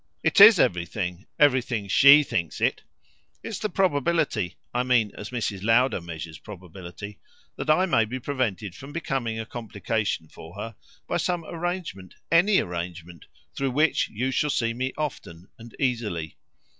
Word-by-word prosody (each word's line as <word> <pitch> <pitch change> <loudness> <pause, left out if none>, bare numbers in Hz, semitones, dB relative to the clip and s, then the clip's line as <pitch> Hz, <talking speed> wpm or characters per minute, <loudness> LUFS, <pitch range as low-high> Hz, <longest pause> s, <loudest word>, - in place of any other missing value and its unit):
"It 205 - +4
IS 205 -2 +10
everything; 90 0 -1
everything 125 -7 +2
SHE 140 +9 +7
thinks 85 - -3
it. - - 0 0.6
It's 220 - -5
the 215 - -2
probability 155 - 0 0.2
I 120 - +1
mean 125 -5 +2
as 105 - -7
Mrs. 110 -6 -3
Lowder 115 +1 +2
measures 80 -2 -8
probability 95 +1 -10 0.4
that 155 - -5
I 180 +5 +4
may 115 -11 +2
be 125 +4 -5
prevented 115 -8 -2
from 135 +7 -11
becoming 130 -9 -2
a 110 - -4
complication 110 -6 -3
for 80 +3 -13
her 115 +3 -7 0.3
by - - 0
some 175 -2 -1
arrangement, 165 - -5 0.2
ANY 185 +5 +5
arrangement, 85 -1 -6 0.3
through 135 0 -1
which 150 +5 +1
you 125 +5 -2
shall 150 +3 0
see 115 -4 0
me 130 +2 -2
often 95 - -6
and 115 0 -12
easily. 110 - -2
115 Hz, 150 wpm, -25 LUFS, 95-145 Hz, 0.6 s, IS